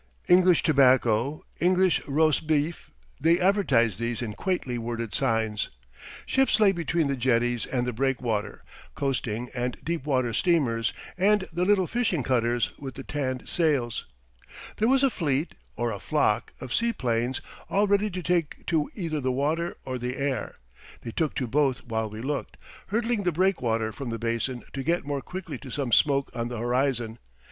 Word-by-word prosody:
English 180 -1 +5
tobacco, 130 -2 +3 0.2
English 185 0 +3
rosbif 155 +1 +1 0.3
they 165 +4 +4
advertised 135 - +3
these 115 0 -2
in 110 -3 -4
quaintly 175 - -2
worded 115 -1 -4
signs. 110 -4 0 0.6
Ships 270 -4 +2
lay 210 -3 +6
between 170 -2 0
the 140 -1 0
jetties 120 -1 +1
and 125 -2 -1
the 125 - -2
breakwater, 120 -4 -1 0.3
coasting 125 -3 -2
and 125 0 -2
deep 165 -3 -2
water 130 -4 +1
steamers, 120 - +2 0.3
and 205 +1 +3
the 175 +2 +1
little 195 -1 +4
fishing 200 - 0
cutters 120 -2 +1
with 135 -3 -7
the 135 - -7
tanned 130 -3 -3
sails. 145 -9 0 0.7
There 220 - +2
was 265 +2 +4
a 270 - +4
fleet 150 -4 -1 0.2
(or 120 -1 0
a 100 - -5
flock) 110 -1 +1
of 125 - -6
seaplanes 125 - 0 0.3
all 200 +2 +3
ready 205 +1 +2
to 180 -2 -5
take 170 -4 -1
to 155 -3 +1
either 165 -6 -2
the 130 -2 0
water 155 +6 -1
or 130 -1 -3
the 125 +2 -3
air. 135 -5 -2 0.5
They 115 - -5
took 155 +5 -1
to 130 - -1
both 135 +1 +1
while 110 -2 -2
we 110 +1 -7
looked, 145 +1 -3 0.3
hurdling 230 +1 0
the 180 -2 +1
breakwater 125 - +1
from 130 +2 -6
the 115 - -3
basin 115 +2 -2
to 135 - -3
get 170 +3 0
more 140 -1 -2
quickly 170 -7 -6
to 135 - -10
some 130 -1 -2
smoke 140 +2 +3
on 115 -1 -2
the 120 -1 -5
horizon. 120 -1 0
135 Hz, 165 wpm, -27 LUFS, 120-170 Hz, 0.7 s, lay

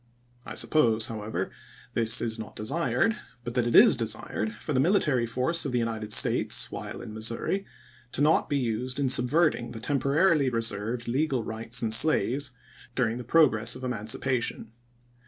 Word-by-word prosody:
I - - -7
suppose, 115 -7 +2
however, 110 -1 -4 0.4
this 115 +1 +3
is 115 -1 -3
not 110 - -8
desired, 170 - 0 0.3
but 120 - -5
that 120 -1 0
it 120 - 0
is - - +8
desired 110 -1 -2
for 145 +7 -5
the 130 - +1
military 140 - +2
force 130 +9 0
of 135 - -4
the - - +1
United 110 -2 -3
States, - - +2
while - - -7
in 105 - -9
Missouri, 115 - -2 0.5
to - - -3
not 155 +2 +2
be 145 - 0
used 125 +1 -2
in 135 -2 +1
subverting 125 -1 +2
the 115 - -7
temporarily 140 +4 +2
reserved 115 0 -3
legal 130 0 0
rights 115 +3 -3
in 110 - -1
slaves 140 +1 +3 0.5
during 120 -2 0
the - - -6
progress 120 -5 +3
of 130 - -10
emancipation. 120 0 -2
120 Hz, 160 wpm, -27 LUFS, 115-140 Hz, 0.5 s, is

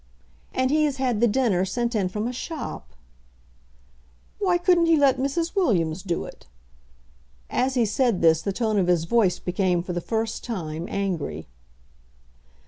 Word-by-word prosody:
"And 260 0 0
he 305 0 +3
has 285 -2 -1
had 250 -5 0
the 240 - +5
dinner 210 -6 +1
sent 235 +5 -2
in 195 -5 0
from 210 +4 -3
a 250 - -4
shop." 310 +5 -6 1.4
"Why 370 -4 +2
couldn't 350 -1 +3
he 330 -1 +5
let 280 -3 +3
Mrs. 325 +5 -1
Williams 180 - +1
do 175 -3 -3
it?" - - -13 1.0
As 260 +1 0
he 240 -2 +3
said 225 -2 +1
this, 160 -1 +4
the 200 - -2
tone 215 0 0
of 180 - +1
his 175 -2 +2
voice 195 0 +2
became 180 -1 0
for 180 - -5
the 175 - -2
first 225 +3 -3
time 165 -7 -4
angry. 195 -6 -3
225 Hz, 160 wpm, -24 LUFS, 180-265 Hz, 1.4 s, the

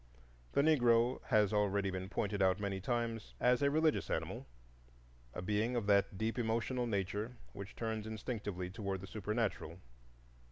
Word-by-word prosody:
The 140 - +4
Negro 120 -5 +4
has 105 -4 +3
already 100 -1 +2
been 95 0 -4
pointed 100 -1 -1
out 95 0 +3
many 100 -2 -2
times 115 0 -2
as 125 +1 +3
a 140 - +4
religious 155 +1 +2
animal,—a - - -7
being 105 +5 0
of 115 -4 0
that 100 -1 +3
deep 110 +4 -1
emotional 115 +2 0
nature 105 +3 -2 0.2
which 100 +1 -8
turns 110 -2 -3
instinctively 105 -5 -4
toward 100 -3 -3
the - - -6
supernatural. 105 -5 -2
105 Hz, 145 wpm, -35 LUFS, 95-115 Hz, 0.2 s, The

